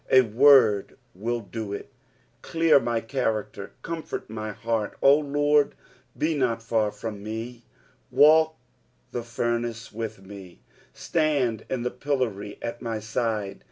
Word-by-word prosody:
A 130 - +7
word 115 -3 +5 0.2
will 115 +5 -2
do 110 -1 -6
it. 100 - -7 0.5
Clear 165 -3 +4
mj 115 -3 -2
character, 110 -6 -2
comfort 165 -1 -5
m; 110 - -7
henit. 110 0 -2
" - - -38
0 135 - +7
Lard, 145 0 +2 0.4
be 160 +1 +1
not 125 -6 0
/or 115 -2 +1
/rom 105 +1 -6
fn«." 115 +3 -6 0.5
Walk 160 +1 +5 0.5
the 120 - -3
furnace 120 0 -3
with 110 -3 -5
me. 95 -3 -12 0.3
Btand 145 -9 0
in 125 -2 -2
the 125 - -1
pillory 115 -8 -2
;it 115 0 -5
my 115 -2 -3
side. 110 -2 -2
115 Hz, 135 wpm, -26 LUFS, 110-135 Hz, 0.5 s, A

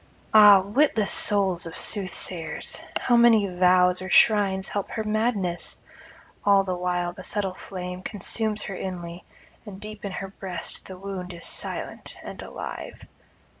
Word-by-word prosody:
Ah, 205 -2 +8
witless 215 0 +1
souls 190 -4 +5
of 165 - -8
soothsayers! 185 -5 +1 0.2
how 245 - +1
may 230 -3 +5
vows 180 0 +3
or 185 - -6
shrines 195 -3 +3
help 200 -1 -4
her 220 - -4
madness? 215 -5 -2 0.7
all 200 -1 +4
the 185 -1 -3
while 180 -1 -2
the 185 0 -11
subtle 195 -2 -2
flame 180 -1 -8
consumes 215 +2 -3
her 195 - -6
inly, 175 -2 -7 0.4
and 200 -3 -11
deep 215 0 -10
in 200 -2 -5
her 195 +1 -6
breast 190 -2 -6
the 185 - -10
wound 185 -2 -7
is 170 - -4
silent - - -1
and - - -9
alive. - - -8
190 Hz, 145 wpm, -24 LUFS, 180-210 Hz, 0.7 s, Ah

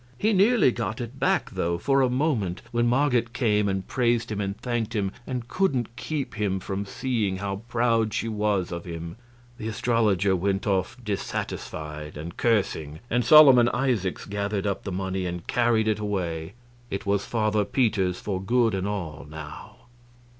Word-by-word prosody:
He 215 - +2
nearly 200 - +5
got 115 -2 -3
it 120 +2 -6
back, - - +1
though, 85 0 -1
for 135 +8 +2
a 130 - +3
moment 125 - 0
when 120 0 +2
Marget 125 -2 +2
came 105 -5 +2
and 95 -1 -2
praised 120 -3 +1
him 105 -1 -2
and 100 +1 -3
thanked 120 -2 -2
him 100 -2 0 0.2
and 125 -3 -4
couldn't 130 - 0
keep 130 +2 -3
him 100 -3 -1
from 100 +2 -4
seeing 110 -4 -1
how 100 0 -3
proud 115 -2 +2
she 115 - -2
was 105 -4 0
of 85 0 -5
him. 85 -1 -6 0.4
The 110 - -4
astrologer 110 -4 +2
went 95 +2 0
off 95 -3 0
dissatisfied 75 -7 -4
and 80 +3 -7
cursing, 80 -9 0
and 120 +1 +2
Solomon 130 -2 +8
Isaacs 120 -9 -1
gathered 100 0 -2
up 100 -1 -2
the 100 - -3
money 95 0 -2
and 90 -1 -5
carried 115 -2 +2
it 110 -1 +1
away. 90 -5 -3 0.4
It 100 - -4
was 100 0 +1
Father 110 -2 +1
Peter's 100 -6 +1
for 95 -3 -3
good 115 +2 +2
and 95 0 -1
all, 85 -8 -4
now. 75 -1 -9
105 Hz, 170 wpm, -26 LUFS, 95-120 Hz, 0.4 s, Solomon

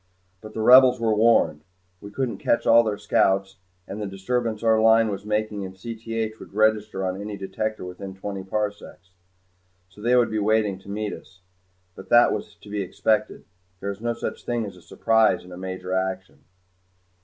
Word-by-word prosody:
But 110 0 -11
the 110 - -2
Rebels 125 +1 +7
were 115 -1 +1
warned. 110 -9 +3 0.4
We 100 - -9
couldn't 125 +3 -3
catch 115 - +1
all 115 +1 +7
their 105 -2 -2
scouts 95 -2 +1 0.3
and 105 +2 -6
the 105 - -3
disturbance 110 +3 -2
our 110 -1 +4
Line 110 0 +5
was 100 0 -6
making 105 -1 -1
in 95 -1 -6
Cth 115 +2 -5
would - - -13
register 105 -2 +1
on 95 +1 -3
any 105 0 -6
detector 100 +2 -4
within 95 +1 -8
twenty 95 0 -6
parsecs. 100 -2 -5 0.8
So 95 +2 -16
they 120 +3 +2
would 120 -2 +3
be 110 - -1
waiting 105 -2 +1
to 100 - -15
meet 105 +1 -3
us. 95 -1 -13 0.5
But 95 - -13
that 120 0 +6
was - - -6
to - - -16
be 105 -1 -2
expected. 105 +3 -1 0.3
There 100 - -3
is 100 +1 -10
no 120 0 -1
such - - -5
thing 120 -2 -2
as 90 -4 -11
surprise 110 +4 +2
in 90 - -13
a 90 - -9
major 95 0 -5
action. 95 0 -3
105 Hz, 185 wpm, -24 LUFS, 95-110 Hz, 0.8 s, Rebels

